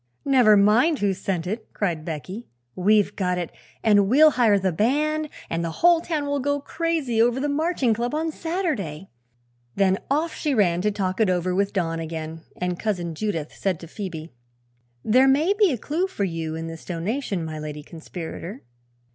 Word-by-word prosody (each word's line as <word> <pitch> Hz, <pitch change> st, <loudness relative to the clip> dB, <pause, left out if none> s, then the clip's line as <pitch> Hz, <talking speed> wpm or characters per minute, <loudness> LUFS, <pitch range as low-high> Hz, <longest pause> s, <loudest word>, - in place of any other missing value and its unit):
"Never 245 Hz, -6 st, +6 dB
mind 225 Hz, +11 st, +4 dB
who 200 Hz, -4 st, +1 dB
sent 180 Hz, -2 st, -3 dB
it," 215 Hz, +5 st, -5 dB
cried 170 Hz, -6 st, -1 dB
Becky; 175 Hz, +8 st, -6 dB, 0.3 s
"we've 205 Hz, +2 st, +3 dB
got 180 Hz, -2 st, 0 dB
it, 175 Hz, -2 st, -3 dB, 0.3 s
and 205 Hz, -3 st, +4 dB
we'll 305 Hz, +5 st, +7 dB
hire 230 Hz, -6 st, +4 dB
the 190 Hz, -1 st, 0 dB
band, 300 Hz, -, +1 dB, 0.2 s
and 165 Hz, +1 st, -2 dB
the 165 Hz, -, -1 dB
whole 345 Hz, -1 st, +6 dB
town 315 Hz, -4 st, -2 dB
will 285 Hz, 0 st, -1 dB
go 285 Hz, +2 st, 0 dB
crazy 300 Hz, -6 st, -1 dB
over 240 Hz, +2 st, +3 dB
the 290 Hz, -, 0 dB
Marching 290 Hz, -4 st, +1 dB
Club 240 Hz, +5 st, -2 dB
on 320 Hz, +1 st, -1 dB
Saturday!" 300 Hz, -, -3 dB, 0.6 s
Then 195 Hz, -1 st, +2 dB
off 310 Hz, +4 st, 0 dB
she 295 Hz, -3 st, -1 dB
ran 180 Hz, -5 st, +2 dB
to 210 Hz, -, +2 dB
talk 190 Hz, 0 st, -2 dB
it 215 Hz, -, +3 dB
over 180 Hz, 0 st, 0 dB
with 200 Hz, +2 st, +1 dB
Don 165 Hz, -4 st, -1 dB
again, 160 Hz, 0 st, -5 dB, 0.2 s
and 180 Hz, -1 st, -2 dB
Cousin 180 Hz, -6 st, -2 dB
Judith 165 Hz, -4 st, -3 dB
said 185 Hz, -5 st, -2 dB
to 165 Hz, -, -9 dB
Phoebe: 170 Hz, -3 st, -7 dB, 0.7 s
"There 255 Hz, +5 st, +5 dB
may 300 Hz, +8 st, +4 dB
be 410 Hz, -4 st, +3 dB
a 255 Hz, -, -1 dB
clew 325 Hz, -, -1 dB
for 290 Hz, -, -3 dB
you 165 Hz, -3 st, -3 dB
in 165 Hz, 0 st, -5 dB
this 165 Hz, 0 st, -8 dB
donation, 185 Hz, +1 st, -3 dB
my 155 Hz, -1 st, -5 dB
Lady 150 Hz, -1 st, -6 dB
Conspirator." 170 Hz, -, -8 dB
205 Hz, 180 wpm, -24 LUFS, 175-280 Hz, 0.7 s, we'll